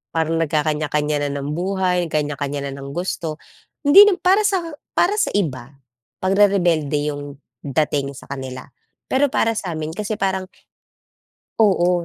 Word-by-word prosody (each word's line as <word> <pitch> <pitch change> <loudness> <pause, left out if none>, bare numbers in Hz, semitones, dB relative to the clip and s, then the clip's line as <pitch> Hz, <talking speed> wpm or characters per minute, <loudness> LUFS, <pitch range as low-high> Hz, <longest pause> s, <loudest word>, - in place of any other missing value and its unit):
Parang 165 0 +1
nagkakaniya-kaniya 150 -1 0
na - - -3
ng 145 - -3
buhay, 180 +1 0
kaniya-kaniya 145 -2 -2
na - - -6
ng 140 +2 -8
gusto. 175 -3 -3 0.5
Hindi 390 +9 +9
nam 400 - +4
para 395 +3 +4
sa 380 -4 0 0.3
para 410 +5 +2
sa - - +2
iba, 140 -9 -2 0.5
pagrerebelde 175 -7 +2
yung 145 -1 -7 0.2
dating 140 -1 -1
sa - - -11
kanila. 130 -1 -6 0.5
Pero 280 +2 +3
para 225 - +2
samin 160 -6 -4
kasi, 210 +5 -3
parang 190 -1 -1 1.2
oo, 180 -4 +3
160 Hz, 135 wpm, -21 LUFS, 145-195 Hz, 1.2 s, Hindi